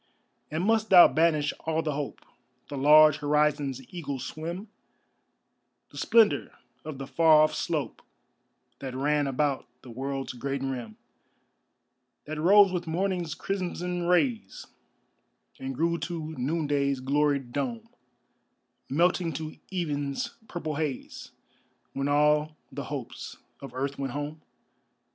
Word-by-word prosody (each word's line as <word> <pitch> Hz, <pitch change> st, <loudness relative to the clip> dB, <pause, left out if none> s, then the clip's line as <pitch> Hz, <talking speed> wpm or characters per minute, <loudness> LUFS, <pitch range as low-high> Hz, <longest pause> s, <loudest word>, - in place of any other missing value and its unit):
And 160 Hz, +4 st, -2 dB
must 220 Hz, 0 st, +2 dB
thou 180 Hz, -2 st, +10 dB
banish 155 Hz, 0 st, +2 dB
all 160 Hz, 0 st, +1 dB
the 155 Hz, -2 st, -1 dB
hope 145 Hz, 0 st, -5 dB, 0.5 s
The 145 Hz, -, -5 dB
large 150 Hz, +2 st, +7 dB
horizon's 145 Hz, -2 st, +1 dB
eagle 145 Hz, -6 st, -4 dB
swim, 170 Hz, -, -6 dB, 1.2 s
The -, -, -8 dB
splendor 225 Hz, -2 st, +3 dB, 0.3 s
of 155 Hz, -3 st, -7 dB
the 135 Hz, -, -6 dB
far 155 Hz, +1 st, +5 dB
off 155 Hz, -, +2 dB
slope 155 Hz, -5 st, -3 dB, 0.8 s
That 130 Hz, -2 st, -6 dB
ran 145 Hz, +2 st, +1 dB
about 140 Hz, +1 st, -1 dB, 0.2 s
the 125 Hz, -, -10 dB
world's 135 Hz, +2 st, -4 dB
great 135 Hz, +2 st, -3 dB
rim, 125 Hz, -5 st, -5 dB, 1.3 s
That 155 Hz, +1 st, -5 dB
rose 195 Hz, +4 st, +6 dB
with 175 Hz, -1 st, -3 dB
morning's 175 Hz, -1 st, -1 dB
crimson 180 Hz, -2 st, -3 dB
rays 220 Hz, +6 st, +1 dB, 0.9 s
And 135 Hz, 0 st, -5 dB
grew 170 Hz, +4 st, 0 dB
to 160 Hz, -2 st, -5 dB
noonday's 140 Hz, -1 st, 0 dB
gloried 140 Hz, -1 st, 0 dB
dome, 225 Hz, -, -3 dB, 1.0 s
Melting 170 Hz, +3 st, +2 dB
to 155 Hz, +2 st, -6 dB
even's 145 Hz, -6 st, -2 dB, 0.2 s
purple 155 Hz, -4 st, -4 dB
haze 150 Hz, -5 st, -4 dB, 0.6 s
When 135 Hz, +1 st, -2 dB
all 150 Hz, +1 st, +2 dB
the -, -, -6 dB
hopes -, -, -7 dB, 0.2 s
of 135 Hz, -3 st, -10 dB
earth 140 Hz, +2 st, -3 dB
went 135 Hz, -2 st, -3 dB
home? 145 Hz, +2 st, -5 dB
150 Hz, 120 wpm, -27 LUFS, 140-170 Hz, 1.3 s, thou